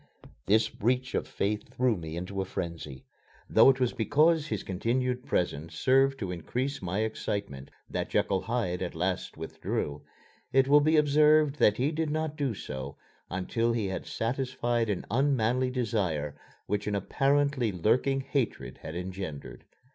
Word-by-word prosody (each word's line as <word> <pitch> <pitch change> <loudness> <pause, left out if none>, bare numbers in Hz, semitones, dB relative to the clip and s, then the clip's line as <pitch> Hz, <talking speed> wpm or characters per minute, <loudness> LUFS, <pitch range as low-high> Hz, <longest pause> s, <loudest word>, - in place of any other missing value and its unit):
This 110 +2 +4
breach 125 +4 -1
of - - -1
faith 105 +1 -3
threw 125 -2 +2
me 80 -2 -6
into 95 +2 -3
a - - -2
frenzy. 85 -7 -6 0.4
Though - - +7
it 135 -1 +3
was 125 -2 +1
because 155 +6 +3
his 105 - -3
continued 125 +6 -1
presence 80 -1 -1
served 135 +1 +3
to 95 -8 -4
increase 125 - -3
my 95 +3 -1
excitement 100 -10 -3 0.2
that - - -3
Jekyll 95 -1 +1
Hyde 110 -7 -2
at 90 -3 -3
last 90 +2 -2
withdrew, 75 0 -3 0.5
it 135 0 +4
will 145 +1 +6
be 155 +2 +3
observed 150 0 +4
that 105 -6 +4
he 135 +5 +1
did 160 0 -1
not 155 0 -2
do 140 -7 -1
so 70 -5 -6 0.3
until 115 +6 0
he 110 -4 -1
had 95 - -5
satisfied 120 -1 -1
an 100 - -2
unmanly 130 -1 +2
desire 100 - -1 0.3
which 105 0 -2
an 105 - 0
apparently 135 +3 +1
lurking 125 +9 +1
hatred 125 - -2
had 80 - -7
engendered. 90 -5 -6
115 Hz, 155 wpm, -29 LUFS, 95-135 Hz, 0.5 s, Though